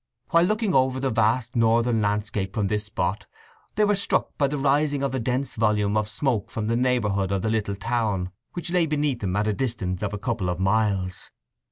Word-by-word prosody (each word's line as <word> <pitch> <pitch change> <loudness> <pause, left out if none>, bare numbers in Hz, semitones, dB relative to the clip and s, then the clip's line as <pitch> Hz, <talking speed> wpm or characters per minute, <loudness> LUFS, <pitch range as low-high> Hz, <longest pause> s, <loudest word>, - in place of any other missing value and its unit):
While 170 +1 +5
looking 215 0 0
over 130 0 +2
the 135 -1 0
vast 120 +3 +1
northern 115 0 +3
landscape 105 -1 -1
from 105 -3 0
this 105 0 -1
spot 105 -2 -2 0.5
they 210 - +3
were 205 - +3
struck 200 - 0
by 140 - +2
the 145 +2 -3
rising 145 +1 +1
of 135 -1 -1
a 130 - 0
dense 125 +2 -1
volume 105 -2 +1
of 105 0 0
smoke 110 -1 -1
from 110 - -3
the 115 +2 0
neighbourhood 105 -6 +1
of 95 -2 -1
the 110 - 0
little 105 -3 -1
town 105 -4 -1 0.2
which 175 0 -4
lay 175 -2 +2
beneath 145 -4 0
them 95 -4 -2
at 105 +1 +1
a 105 - +1
distance 95 -7 -2
of 105 -2 -2
a 105 - -3
couple 105 -3 -2
of 90 0 -2
miles. 95 -2 0
110 Hz, 210 wpm, -25 LUFS, 105-135 Hz, 0.5 s, While